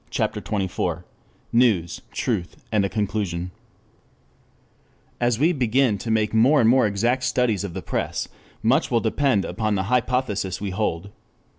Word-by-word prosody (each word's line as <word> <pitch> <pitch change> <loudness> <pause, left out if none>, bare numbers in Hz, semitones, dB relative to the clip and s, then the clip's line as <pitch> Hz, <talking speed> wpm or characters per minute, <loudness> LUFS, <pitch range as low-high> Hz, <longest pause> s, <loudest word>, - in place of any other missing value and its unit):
CHAPTER - - -1
XXIV 90 -4 -2 0.5
NEWS, 110 -9 +2
TRUTH, 85 - -3
AND 105 -2 +2
A 100 - 0
CONCLUSION 95 -4 -2 1.7
As 120 -2 +1
we 155 +7 +3
begin 125 - +2
to 115 - -5
make 110 -1 +1
more 130 +7 +5
and 115 - +4
more 125 -1 +5
exact 120 +6 0
studies 125 -5 +1
of 95 -3 -6
the 95 - -5
press, - - -2 0.4
much 130 +8 +3
will 120 - +2
depend 115 -2 +1
upon 110 -2 -1
the 95 - 0
hypothesis 120 -6 0
we 100 -2 -3
hold. 95 -1 -2
110 Hz, 145 wpm, -23 LUFS, 100-125 Hz, 1.7 s, more